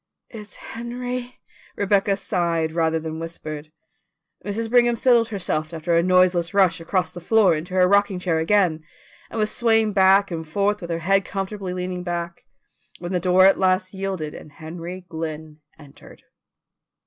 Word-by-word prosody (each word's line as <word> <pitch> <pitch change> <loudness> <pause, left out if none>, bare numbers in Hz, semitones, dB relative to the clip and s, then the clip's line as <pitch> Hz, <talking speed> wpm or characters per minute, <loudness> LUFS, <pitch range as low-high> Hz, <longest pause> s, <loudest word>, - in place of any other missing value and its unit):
"It's 215 -2 -11
Henry," 245 +1 -6 0.4
Rebecca 200 0 +1
sighed 170 -4 -1
rather 160 0 0
than 160 0 -6
whispered. 155 -2 -7 0.7
Mrs. 220 +3 -3
Brigham 240 0 +3
settled 235 -1 +3
herself 170 -6 -3
after 165 +1 -1
a 170 - +4
noiseless 180 0 +2
rush 180 -4 +3
across 180 0 -1
the 175 -1 -9
floor 205 0 +4
into 165 +4 -4
her 180 -1 +5
rocking 200 0 +2
chair 175 -3 0
again, 165 -2 +2 0.5
and - - -7
was 215 -1 0
swaying 225 -2 +2
back 195 0 +4
and 160 -1 -5
forth 205 +5 0
with 170 - -7
her 165 - -1
head 195 +1 +3
comfortably 195 -1 -5
leaning 180 0 -4
back, 170 -1 -5 0.5
when 175 +1 -6
the 180 - 0
door 185 +1 +4
at 195 - +5
last 185 0 +1
yielded 190 -5 -4
and 150 - -12
Henry 170 +4 -8
Glynn 160 -2 -6 0.2
entered. 145 -3 -16
185 Hz, 160 wpm, -22 LUFS, 165-200 Hz, 0.7 s, her